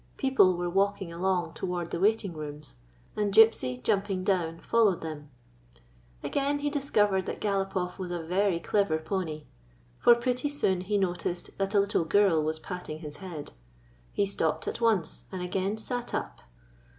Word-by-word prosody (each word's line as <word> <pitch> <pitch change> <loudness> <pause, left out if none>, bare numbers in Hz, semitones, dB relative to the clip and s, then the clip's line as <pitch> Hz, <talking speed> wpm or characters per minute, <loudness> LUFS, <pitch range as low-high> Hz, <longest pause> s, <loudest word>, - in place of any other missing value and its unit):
People 260 -10 +4
were 175 0 -2
walking 195 -1 0
along 180 +1 0
toward 175 -2 -3
the - - -2
waiting 205 -1 +2
rooms, 150 - -8 0.4
and 210 -1 0
Gypsy, 195 - +4
jumping 195 -2 0
down, 175 -4 0
followed 215 -4 +2
them. 150 -2 -7 0.9
Again 285 +1 0
he 290 0 -2
discovered 210 -10 +1
that - - -4
Galopoff 195 -3 -1
was 185 -2 -4
a 175 -1 -3
very 185 +1 +1
clever 185 -2 +1
pony; 160 -2 -3 0.6
for 240 - +7
pretty 250 +3 -1
soon 190 -11 0
he 205 +3 0
noticed 180 -2 -2
that 195 +1 -1
a - - +6
little 200 -3 +2
girl 190 -2 +4
was 155 +1 -1
patting 160 -2 -7
his 150 -2 -8
head. 165 -5 -7 0.6
He 200 - +1
stopped 160 -5 -1
at - - -3
once, 215 -9 +1
and 185 -2 -4
again 190 +3 -1
sat 245 +2 -4
up. - - -4
190 Hz, 160 wpm, -28 LUFS, 170-205 Hz, 0.9 s, for